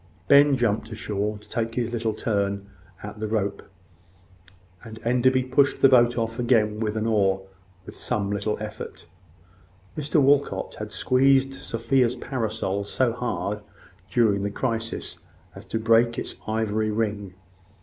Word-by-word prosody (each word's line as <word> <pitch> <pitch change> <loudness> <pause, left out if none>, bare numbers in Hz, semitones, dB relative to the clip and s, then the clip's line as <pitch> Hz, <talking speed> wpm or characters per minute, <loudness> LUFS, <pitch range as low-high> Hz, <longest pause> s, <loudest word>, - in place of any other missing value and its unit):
Ben 140 -1 +6
jumped 110 -2 0
ashore 105 -1 -3
to 105 0 -17
take 115 +1 -3
his 120 -1 -1 0.2
turn 100 -2 -1 0.4
at 105 +1 -8
the 110 - -2
rope, 100 -2 -1 1.2
and 110 -1 -10
Enderby 125 +2 +3
pushed 130 +2 +2
the 135 - +6
boat 120 -2 +5
off 115 +1 -2
again 110 -3 +2
with 110 -1 -2
an 110 - -1
oar, 95 -4 +2 0.4
with - - -10
some 100 -1 -2
little 105 +1 -1
effort. 105 -4 -7 0.9
Mr 150 +1 +1
Walcot 140 0 +2
had - - -6
squeezed 135 +1 +3
Sophia's 125 -1 0
parasol 110 -6 -2
so 115 +4 0
hard, 115 -4 -3 0.5
during 110 -5 +2
the 100 - -1
crisis, 115 +1 -3 0.3
as - - -11
to - - -3
break 115 +1 +3
its - - -3
ivory 110 0 0
ring. 105 -3 -2
115 Hz, 140 wpm, -25 LUFS, 105-125 Hz, 1.2 s, Ben